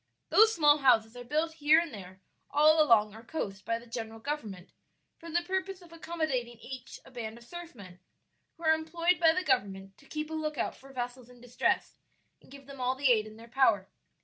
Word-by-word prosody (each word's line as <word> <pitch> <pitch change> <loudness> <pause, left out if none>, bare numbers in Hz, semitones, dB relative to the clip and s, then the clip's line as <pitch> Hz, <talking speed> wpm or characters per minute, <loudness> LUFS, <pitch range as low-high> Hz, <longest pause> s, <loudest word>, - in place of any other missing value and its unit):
Those 440 +1 +6
small 295 -2 +5
houses 235 -4 +3
are 245 - -8
built 310 +6 -1
here 305 +2 +6
and 335 -3 -4
there 190 -2 -11 0.3
all 310 +1 +5
along 215 -8 +4
our 220 +1 -12
coast 195 -8 -5
by 230 - 0
the 235 - -13
general 225 -1 -6
government, 220 -9 -5 0.5
for 335 - -10
the 345 +2 0
purpose 380 +1 -3
of 335 -1 -16
accommodating 315 -8 -3
each 250 +2 -9
a - - -15
band 230 -3 -6
of 235 - -15
surf 345 +3 -10
men, 185 -5 -13 0.6
who 335 - -14
are 315 0 +5
employed 335 +2 0
by 325 -1 +6
the 365 +3 -1
government 195 - -1
to - - -20
keep 305 0 -5
a - - -4
lookout 305 -2 -2
for 275 +1 -15
vessels 245 -1 -6
in 250 -1 -16
distress, 245 0 -1 0.4
and - - -21
give 275 0 -12
them 275 -1 -10
all 250 +1 +1
the 270 -1 +3
aid 215 -2 +2
in 215 0 -12
their 230 +1 -13
power. 230 -6 +2
260 Hz, 210 wpm, -30 LUFS, 230-315 Hz, 0.6 s, Those